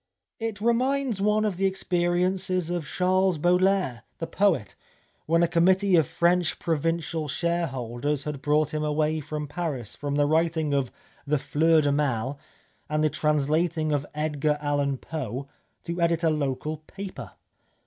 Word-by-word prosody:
It 225 -2 -3
reminds 245 -1 +1
one 210 +1 +2
of 200 -4 -1
the 195 +1 +2
experiences 180 -1 0
of 175 -5 -3
Charles 185 +1 +2
Baudelaire, 180 -5 +2 0.2
the 165 - -3
poet, 165 - +1 0.5
when 165 +2 +3
a - - +4
committee 185 +3 +3
of 160 -5 +4
French 175 0 +1
provincial 165 0 -1
shareholders 145 -4 -2
had 150 -2 -5
brought 150 +1 +1
him 155 0 -1
away 155 +1 +1
from 150 0 -5
Paris, 145 - -4
from 145 -1 -3
the 145 0 +3
writing 160 -1 +1
of 135 -3 0 0.4
the 150 +1 +2
Fleurs 160 +3 +3
du 145 - +2
Mai 135 -3 0 0.6
and 155 0 +1
the 155 - +2
translating 155 +2 +1
of 145 -1 -1
Edgar 150 -1 0
Allan 145 -2 0
Poe, 140 -3 -5 0.4
to 170 +1 -4
edit 170 0 +2
a 165 - +4
local 150 +1 -2
paper. 195 +5 -9
155 Hz, 150 wpm, -26 LUFS, 145-175 Hz, 0.6 s, a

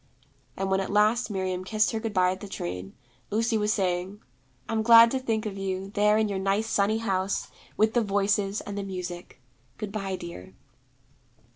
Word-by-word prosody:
And 195 0 -2
when 190 - +3
at 195 - -3
last 215 +4 +2
Miriam 185 -2 -2
kissed 215 +3 +1
her 225 - -2
good 225 0 -3
bye 185 -2 +3
at 185 - -5
the 205 - -8
train, 90 - -6 0.3
Lucy 225 +2 0
was 210 -1 +1
saying, 185 0 -1 0.5
'I'm 220 -1 0
glad 230 +1 +8
to 265 - 0
think 225 -4 -1
of 200 -2 -5
you, 190 0 -3
there 210 +1 +3
in 220 0 +2
your 200 -2 -2
nice 195 +3 +1
sunny 215 0 +1
house, 195 -3 -1 0.3
with 220 +1 +3
the 240 - +3
Voices, 200 0 0
and 200 - -7
the 200 - -2
Music. 180 -5 -7 0.4
Good 210 -2 -5
bye, 195 -2 -3
dear.' 95 - -9
200 Hz, 185 wpm, -27 LUFS, 190-215 Hz, 0.5 s, glad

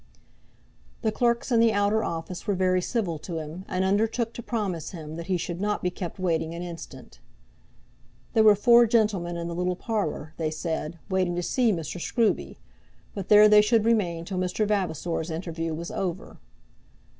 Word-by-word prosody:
The 220 - +2
clerks 235 +2 0
in 235 - +4
the 230 -1 +4
outer 205 +2 +2
office 170 +4 -5
were 205 - +1
very 185 0 +2
civil 180 -7 -2
to 165 +2 -6
him, 160 +4 -7
and 185 +1 -1
undertook 225 +4 +1
to - - -7
promise 200 -9 -3
him 160 -4 -8
that 170 0 -7
he 185 -2 +1
should 175 +1 -4
not 210 0 -1
be 180 - 0
kept 175 -1 -6
waiting 165 -3 -1
an 170 - -5
instant. 170 -2 -10 1.1
There 225 - +4
were 210 -1 +7
four 235 +3 +6
gentlemen 210 -7 +1
in 170 0 -4
the 170 - -4
little 180 +1 -1
parlour, 180 -7 -3
they 160 -2 -1
said, 160 0 -4
waiting 185 -2 0
to 175 - -2
see 240 +4 +2
Mr. 170 -1 -4
Scruby, 230 +3 0 0.6
but 195 -3 -6
there 210 0 +8
they 210 0 +7
should 220 0 +2
remain 180 -8 +1
till 185 0 -3
Mr. 185 +4 0
Vavasor's 175 -4 -1
interview 165 0 -4
was 170 +2 -6
over. 190 +3 -4
185 Hz, 180 wpm, -26 LUFS, 170-215 Hz, 1.1 s, there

